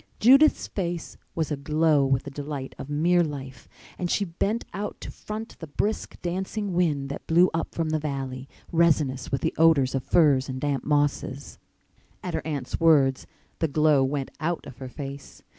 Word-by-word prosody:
Judith's 275 +7 +6
face 175 -4 -4 0.2
was 160 -2 -1
aglow 150 +1 +2
with 135 -1 +1
the 140 - -8
delight 140 -1 -5
of 135 - -7
mere 170 +4 +3
life 135 -5 -7 0.3
and 175 - -1
she 200 - +1
bent 200 +6 -2
out 205 +1 -4
to - - -7
front 215 +1 -7
the 160 - -7
brisk, 210 +9 -2
dancing 190 +3 -3
wind 155 -6 +1
that 140 - -7
blew 175 +3 +5
up 165 - -3
from 165 -2 -1
the 155 - +1
valley, 135 -3 -4 0.2
resinous 150 -7 +2
with 135 - 0
the - - 0
odors 155 -5 +5
of 135 -2 -1
firs 140 -6 +3
and 130 0 -4
damp 140 -1 -1
mosses. 145 -2 -1 0.6
At - - -4
her - - -1
aunt's 140 -5 -3
words 145 -5 +4 0.3
the 160 - +2
glow 150 -1 +3
went 135 0 -2
out 165 +2 -2
of 130 - -11
her 130 -1 -6
face. 140 +1 -8
150 Hz, 175 wpm, -26 LUFS, 135-170 Hz, 0.6 s, Judith's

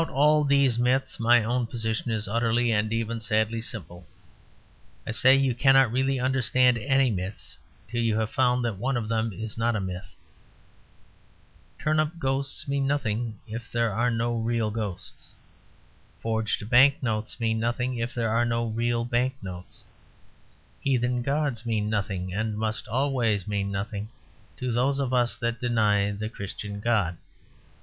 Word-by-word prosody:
About 165 - -3
all 150 +2 +4
these 140 -4 +3
myths 125 +2 +1
my 120 0 +5
own 120 +1 0
position 115 0 -2
is 110 -2 -1
utterly 115 +2 +1
and 110 0 +1
even 115 0 -2
sadly 110 0 0
simple. 90 -4 -5 1.0
I - - -3
say 130 +4 +5
you 135 -2 +2
cannot 135 -1 +4
really 135 +2 +1
understand 125 -1 +2
any 135 +1 +2
myths 95 0 -5 0.3
till 120 +2 -2
you 115 -2 +1
have 110 0 -1
found 125 -1 +2
that 110 -5 -3
one 130 +2 0
of 115 -3 -3
them 115 0 0
is 110 +3 -7
not 115 0 +1
a - - 0
myth. 95 +2 -6 1.6
Turnip 155 +2 0
ghosts 135 -2 -2
mean 140 -1 0
nothing 120 -5 -1
if 115 +2 -7
there 115 -3 0
are 120 +5 +1
no 120 0 -1
real 115 -1 0
ghosts. 105 -4 -6 0.8
Forged 110 -2 -1
bank 135 +4 +5
notes 110 -1 -2
mean 110 -1 0
nothing 120 +2 -1
if 115 +2 -2
there 115 -2 0
are 115 +2 +2
no 115 0 0
real 115 +1 -1
bank 125 +2 0
notes. 90 -2 -9 1.0
Heathen 125 -2 0
gods 140 -3 -1
mean 110 -2 -1
nothing, 95 -3 -2
and 110 +1 -2
must 110 0 -2
always 120 -5 0
mean 100 -1 -1
nothing, 100 +2 -4 0.5
to 125 -1 -2
those 130 +4 +1
of 135 -2 -1
us 120 -1 +1
that 115 -1 -2
deny 105 -4 +2
the 105 +1 -4
Christian 100 -1 -6
God. 100 -7 0
115 Hz, 155 wpm, -26 LUFS, 110-125 Hz, 1.6 s, my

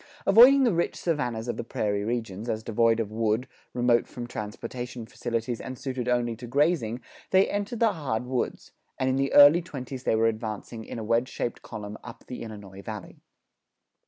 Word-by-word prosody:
Avoiding 250 +7 +8
the 240 -6 +3
rich 170 0 0
savannas 125 -9 -2
of 120 - -2
the - - -3
prairie 100 -3 -1
regions, 115 -1 -3
as 110 -1 -2
devoid 115 0 +2
of 110 -2 -2
wood, 110 +2 0 0.2
remote 120 -1 +2
from 120 - -7
transportation 120 +2 -6
facilities, 120 -1 -3
and 130 0 -6
suited 130 -2 -4
only 120 -1 +1
to 120 +1 -8
grazing, 135 -3 +1 0.3
they 190 +1 +5
entered 205 +3 -3
the 225 -3 +4
hard 130 -8 -2
woods 125 -1 -3 0.3
and 130 0 +1
in - - +1
the 135 0 0
early 145 +4 +9
twenties 130 -5 -7
they - - +2
were 110 +1 +3
advancing 110 0 -3
in - - -7
a 115 - -4
wedge 115 +4 +1
shaped 120 - -4
column 105 -2 -7
up 120 - -10
the 125 - -7
Illinois 100 -4 -9
Valley. 105 -1 -8
120 Hz, 185 wpm, -27 LUFS, 110-130 Hz, 0.3 s, early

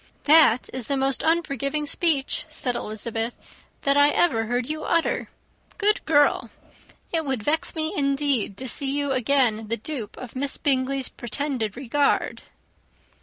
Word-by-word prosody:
"That 295 -6 +5
is 250 -3 -4
the 280 - 0
most 270 0 +2
unforgiving 300 -3 0
speech," 290 -2 0
said 250 -2 -2
Elizabeth, 225 +2 -3 0.5
"that 280 0 +3
I 285 0 +6
ever 290 -8 +2
heard 245 +1 -1
you 310 +1 -4
utter. 335 -1 0 0.5
Good 420 0 +1
girl! 290 -2 +3 0.6
It 325 -1 +1
would 265 -7 -3
vex 315 +6 +1
me, 315 0 -1
indeed, 275 -7 0
to 260 - -5
see 270 +2 0
you 285 0 -1
again 250 -4 +2
the 230 +2 -1
dupe 235 -3 -6
of 255 -1 -9
Miss 275 +1 -1
Bingley's 270 -2 0
pretended 240 -3 -4
regard." 275 +2 0
275 Hz, 145 wpm, -24 LUFS, 245-295 Hz, 0.6 s, I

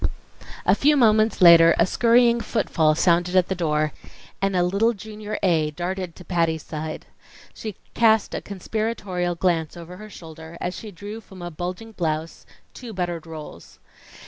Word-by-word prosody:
A - - +5
few 295 +1 +3
moments 220 -4 +3
later 170 -1 +8
a - - +4
scurrying 235 +3 +3
footfall 155 -7 +1
sounded 175 +2 +2
at 185 -1 +3
the - - +1
door, 155 -4 0 0.5
and 195 -1 0
a 180 - +3
little 200 +6 +2
Junior 215 +1 -7
A. 160 -5 +2
darted 180 +2 -4
to 180 - -13
Patty's 165 -3 0
side. 155 0 -6 0.5
She 215 -3 -7 0.2
cast 220 -2 +3
a - - -3
conspiratorial 200 -3 -3
glance 170 -2 0
over 170 +1 -10
her 215 +2 -10
shoulder 160 -2 -11
as 180 - -3
she 220 - -8
drew 205 +4 -8
from 190 -4 -12
a 175 - -5
bulging 180 +7 -6
blouse 160 -4 -3 0.3
two 240 -3 -9
buttered 175 -3 -3
rolls. 155 -2 -10
180 Hz, 160 wpm, -23 LUFS, 165-215 Hz, 0.5 s, later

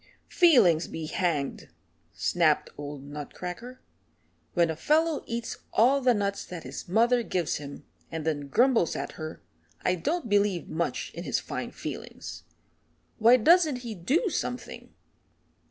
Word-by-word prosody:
"Feelings 240 - +5
be 160 -1 -5
hanged," 155 -4 -2 0.4
snapped - - +1
old 145 -1 -7
Nutcracker. 180 - -7 0.7
"When 170 -2 +3
a - - -4
fellow 310 - +2
eats 230 0 -4
all 265 +5 +4
the 250 -2 +4
nuts 200 -1 -1
that 175 -3 -8
his 130 +2 -7
mother 235 +5 +4
gives 180 -7 -1
him, 140 -1 -9 0.3
and 160 -2 -4
then 145 -3 -1
grumbles 235 - +3
at - - -4
her, 155 0 -8 0.4
I 180 - +2
don't 265 - -2
believe 205 -4 +1
much 170 +1 -2
in - - -6
his - - 0
fine - - -5
feelings. - - -8 0.7
Why 235 +3 +7
doesn't 305 -1 +4
he 230 - -4
do 265 - +1
something? 250 -4 -4
200 Hz, 140 wpm, -28 LUFS, 160-250 Hz, 0.7 s, Why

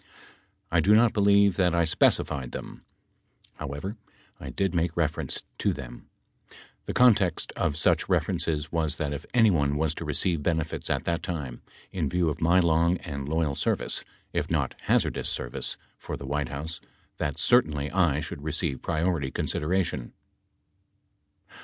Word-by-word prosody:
I 85 - +4
do 100 +6 +5
not 115 0 +5
believe 100 -2 +4
that 90 -3 +3
I 85 0 +3
specified 70 -5 +2
them. - - -8 0.7
However, 75 +9 -5 0.4
I - - -7
did 95 -2 -1
make 85 -1 0
reference 80 -3 -1 0.2
to - - +2
them. - - -9 0.8
The - - -3
context 105 -9 +4
of 75 - 0
such 80 - +2
references 75 -3 0
was 80 -2 0
that 75 -2 -2
if 70 - -7
anyone 85 -12 +4
was 80 0 +1
to 85 - -6
receive 80 +2 0
benefits 80 0 -1
at - - 0
that 85 -1 0
time, 70 -8 -5 0.3
in 80 -7 -1
view 90 0 +1
of 75 - -5
my 85 +3 +5
long 85 +1 +3
and 70 -3 -6
loyal 80 -2 +1
service, - - -1 0.3
if - - -1
not - - 0
hazardous - - +1
service, - - -4 0.2
for - - -5
the 70 - -8
White 70 0 -2
House 75 +3 -5 0.4
that 70 - -2
certainly 75 -1 +2
I 80 -6 +2
should 70 - -6
receive 80 -2 -2
priority 80 -3 0
consideration. 75 -2 -1
80 Hz, 150 wpm, -27 LUFS, 75-90 Hz, 0.8 s, do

